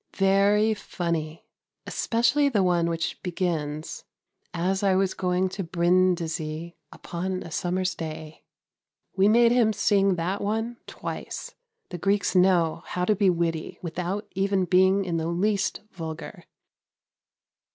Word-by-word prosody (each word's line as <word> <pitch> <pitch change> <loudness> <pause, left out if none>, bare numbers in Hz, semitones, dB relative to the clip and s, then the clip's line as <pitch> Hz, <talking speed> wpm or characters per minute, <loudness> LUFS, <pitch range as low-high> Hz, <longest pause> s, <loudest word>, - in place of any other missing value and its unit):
Very 200 +3 +4
funny, 170 -6 -4 0.4
especially 280 +5 +2
the 210 -7 +2
one 175 -2 +2
which 165 -1 -3
begins: 160 -5 -3 0.5
"As 180 +3 -1
I 195 -2 +3
was 190 0 +1
going 180 0 0
to 195 +1 -4
Brindisi, 170 -2 0 0.2
upon 185 +2 -4
a 165 - -10
summer's 185 +3 -1
day." 155 -1 -7 0.7
We 195 +1 +4
made 235 +2 +5
him 240 -3 +4
sing 200 -2 +2
that 180 +4 -2
one 225 +3 -2
twice. - - -6 0.4
The 175 - -6
Greeks 200 +3 +1
know 180 -3 +3
how 180 0 -2
to 215 - +3
be 195 -1 +3
witty 165 -2 -1
without 180 +4 -3
even 195 -1 +1
being 190 +2 +3
in 170 -2 -1
the 160 0 -2
least 195 +4 0
vulgar. 160 -2 -7
185 Hz, 130 wpm, -26 LUFS, 170-200 Hz, 0.7 s, made